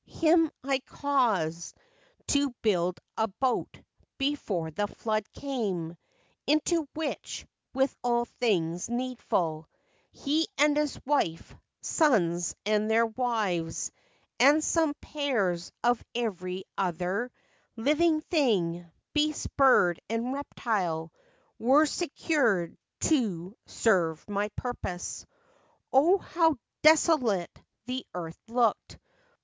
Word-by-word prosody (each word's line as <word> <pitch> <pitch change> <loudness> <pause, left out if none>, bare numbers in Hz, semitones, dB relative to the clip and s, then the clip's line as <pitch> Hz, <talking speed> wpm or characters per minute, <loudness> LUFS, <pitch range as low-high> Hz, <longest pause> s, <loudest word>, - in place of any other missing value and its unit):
Him 330 0 +3
I 270 0 +1
caused 220 - 0 0.5
to 285 0 +3
Build 180 -4 +1 0.2
a 220 - +2
boat 245 +5 -2 0.4
before 220 - -1
the 205 +7 -1
flood 215 0 -3
came, 195 -12 -3 0.5
Into 310 +1 +2
which, 310 -2 -4 0.3
with 265 0 +1
all 240 -1 +2
things 180 -7 -1
needful, 230 -10 -2 0.4
He 310 +4 0
and 295 0 +4
his 300 -1 0
wife, 255 - 0 0.3
sons 175 - +2
and 215 0 +1
their 225 +1 +4
wives, 220 -8 -1 0.5
And 290 +5 +6
some 320 -3 +2
pairs 210 - -1
of 240 -1 +2
every 190 -5 -3
other 185 +6 -1 0.4
Living 310 +6 +2
thing, 185 - 0 0.2
beast, 305 0 0
bird, 250 -11 +5
and 230 +3 -1
reptile, 185 - -2 0.5
Were 270 +7 +5
secured 275 - 0 0.3
to 205 - 0
serve 170 -8 +1
my 205 0 -1
purpose. 195 -8 -5 0.3
" - - -38
O, 320 +9 +6
how 325 -5 +1 0.2
desolate 305 - +4 0.3
the 255 +1 -3
earth 165 -2 -6
looked 230 -1 0
235 Hz, 100 wpm, -28 LUFS, 180-285 Hz, 0.5 s, And